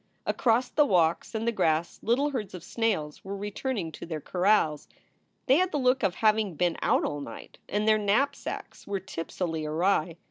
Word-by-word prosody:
Across 245 +1 +2
the 295 - +3
walks 170 +2 +2
and 220 +1 -2
the - - +3
grass 165 -5 0
little 270 +6 +1
herds 215 -9 -4
of 175 - -9
snails 190 -10 -2
were 200 +1 -5
returning 205 -2 -3
to - - -8
their 160 -2 -4
corrals. 175 -3 +1 0.6
They 265 +2 +5
had 370 +1 +2
the - - 0
look 255 -1 +2
of 190 -4 +1
having 215 -4 +2
been 175 +2 +1
out - - +2
all 145 0 -3
night 115 -5 -10
and 210 +2 0
their 215 0 +5
knapsacks 215 +8 -1
were 200 -1 -1
tipsily 165 -2 -4
awry. 165 +1 +1
200 Hz, 180 wpm, -28 LUFS, 165-230 Hz, 0.6 s, They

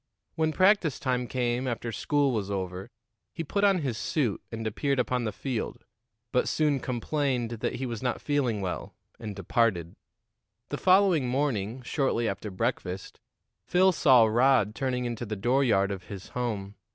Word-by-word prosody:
When 160 -1 +1
practice 185 -4 +3
time 125 -2 -1
came 125 0 -1
after 120 -1 -3
school 145 +4 +1
was 105 -5 -2
over, 95 +1 -4 0.5
he 165 - -3
put 200 +6 -1
on 195 -5 +4
his 120 -5 -2
suit 140 - -1
and 115 -1 -5
appeared 135 +6 0
upon 125 -1 0
the 110 - -1
field, 125 0 -4 0.5
but 125 - +2
soon 150 -3 +1
complained 125 -1 -1
that - - -2
he 130 - -3
was 115 -3 -4
not 125 -2 -1
feeling 130 -8 0
well, 90 -2 -4 0.2
and 105 -2 -6
departed. 95 -3 0 0.7
The - - -3
following 185 -7 +4
morning, 125 -3 -1
shortly 130 -3 0
after 105 +1 -3
breakfast, 95 0 -3 0.5
Phil 185 +2 +4
saw 130 -9 +6
Rod 115 -1 +3
turning 125 -1 -2
into 120 -1 -3
the 110 -2 -4
dooryard 115 -3 +2
of 95 -2 -6
his 100 -3 -9
home. 105 -5 -3
125 Hz, 160 wpm, -28 LUFS, 110-140 Hz, 0.7 s, saw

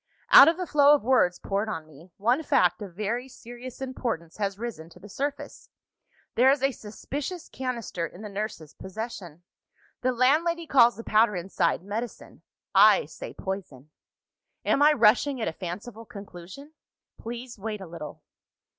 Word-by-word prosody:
"Out 275 - +11
of 325 - +3
the 365 - -3
flow 295 -2 +5
of 290 - -3
words 215 -8 +3
poured 200 +2 -2
on 165 -7 -5
me, 155 +4 -17
one 240 +8 +2
fact 295 - +2
of 190 -4 -8
very 230 +6 -2
serious 245 +1 -11
importance 230 -11 -4
has 200 -2 -2
risen 210 -8 -6
to 180 - -17
the 200 - -12
surface. 285 - -5 0.6
There 255 +3 +5
is 275 -1 +2
a 275 - +3
suspicious 285 - -6
canister 235 -9 -4
in 180 +6 -13
the - - -5
nurse's 200 -6 -6
possession. 190 -5 -8 0.6
The 255 - +1
landlady 315 +7 +2
calls 245 -5 +5
the 230 - -8
powder 215 -1 +3
inside, 175 -1 -1
medicine. 215 +4 -6 0.3
I - - +6
say, - - -9
poison. 155 -8 -6 0.7
"Am 275 - +2
I 300 +1 +7
rushing 250 +3 +3
at 220 - -2
a 165 - -2
fanciful 205 +7 -7
conclusion? 200 - -11 0.5
Please 235 0 -7
wait 210 +1 -4
a 190 - -8
little. 165 -3 -9
225 Hz, 160 wpm, -26 LUFS, 190-260 Hz, 0.7 s, Out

